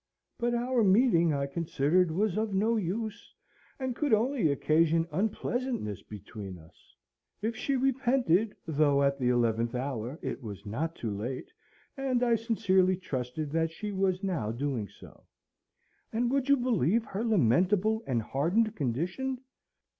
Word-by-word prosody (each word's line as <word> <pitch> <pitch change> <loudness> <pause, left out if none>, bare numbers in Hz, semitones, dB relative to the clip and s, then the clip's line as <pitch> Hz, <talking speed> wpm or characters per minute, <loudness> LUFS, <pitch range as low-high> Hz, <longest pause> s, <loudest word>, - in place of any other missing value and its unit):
But 240 0 +1
our 240 0 +1
meeting, 190 -5 +4
I 140 -1 0
considered, 160 +3 +1
was 190 +3 0
of 215 -2 -1
no 220 +4 +2
use, 215 +2 -4 0.4
and 260 -2 -2
could 290 -5 +3
only 230 - +1
occasion 165 +3 +2
unpleasantness 220 - -2
between 100 -2 -9
us. 80 -1 -20 0.5
If 225 +1 -1
she 275 +4 -1
repented, 250 - +2
though 145 -3 +2
at 140 0 +1
the 125 -1 +1
eleventh 115 0 +1
hour, 125 +1 -3
it - - -4
was 100 -3 -8
not 155 +11 -3
too 115 - -4
late, 120 +6 -5 0.4
and 265 -3 0
I 240 -1 +3
sincerely 195 -5 +2
trusted 140 -3 -4
that 165 +1 +1
she 210 +6 -6
was 190 -1 0
now 160 - -1
doing 120 -3 -2
so. - - -16 0.8
And, 235 +2 0
would 275 0 0
you 280 - +6
believe 230 - +1
her 200 +2 -4
lamentable 205 - +3
and 120 -4 0
hardened 195 - +1
condition? 175 - -2
180 Hz, 145 wpm, -29 LUFS, 140-230 Hz, 0.8 s, you